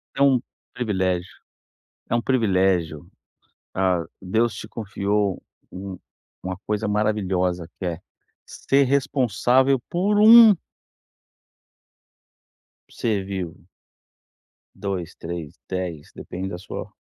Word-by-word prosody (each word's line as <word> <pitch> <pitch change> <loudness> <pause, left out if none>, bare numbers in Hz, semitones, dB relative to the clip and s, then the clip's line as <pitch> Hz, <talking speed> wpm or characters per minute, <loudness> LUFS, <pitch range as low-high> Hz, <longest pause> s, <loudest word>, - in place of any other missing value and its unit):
É 135 - -2
um 135 -3 +5 0.3
privilégio, 95 -6 -1 0.8
é - - +3
um 120 - +2
privilégio, 95 - +1 0.7
ah, 95 -3 +1 0.2
Deus 110 +5 +1
te - - -8
confiou, 100 -2 -1 0.3
um 95 0 -7 0.5
uma 95 -1 -4
coisa 105 0 -1
maravilhosa 95 -5 0
que 95 - -4
é, 85 -2 -3 0.5
ser 140 +1 +1
responsável 130 -1 +2
por 200 +4 +1
um 225 0 +10 2.4
ser 105 -4 -1
vivo. 95 -4 -6 1.1
2, 95 -5 -4
3, 85 -3 -7
10, 90 -5 -4
depende 95 +1 -6
da 90 - -5
sua 95 - -7
100 Hz, 100 wpm, -23 LUFS, 90-120 Hz, 2.4 s, um